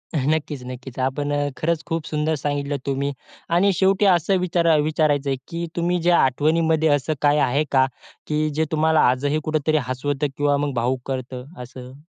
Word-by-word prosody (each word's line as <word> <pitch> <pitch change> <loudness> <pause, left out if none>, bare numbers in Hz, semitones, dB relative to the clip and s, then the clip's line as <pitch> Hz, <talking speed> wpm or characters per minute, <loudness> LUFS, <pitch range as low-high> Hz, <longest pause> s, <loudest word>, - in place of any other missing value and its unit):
नक्कीच, 145 -1 -1
नक्कीच. 125 0 -9
आपण 145 +3 -1
अ, 145 0 0
खरंच 165 0 -1
खूप 165 -2 -2
सुंदर 155 +1 0
सांगितलं 145 0 -2
तुम्ही 140 +1 -1 0.4
आणि 195 +3 +4
शेवटी 195 +3 +2
असं 185 +1 +3
विचारा 170 -2 +2
विचारायचं 150 -2 +1
आहे 135 - 0
की 170 0 -4
तुम्ही 175 +1 0
ज्या 175 0 +4
आठवणीमध्ये 160 +4 +2
असं 145 +1 +1
काय 145 0 +4
आहे 145 +4 +1
का, 130 -1 +4 0.4
की 155 0 0
जे 155 +2 -1
तुम्हाला 160 0 +2
आजही 140 +4 0
कुठेतरी 155 0 0
हसवतं 145 +3 -1
किंवा 145 0 +2
मग 145 -1 -2
भावूक 125 +2 0
करतं 130 -1 -5 0.2
असं? 125 +1 -11
150 Hz, 170 wpm, -22 LUFS, 135-160 Hz, 0.4 s, आणि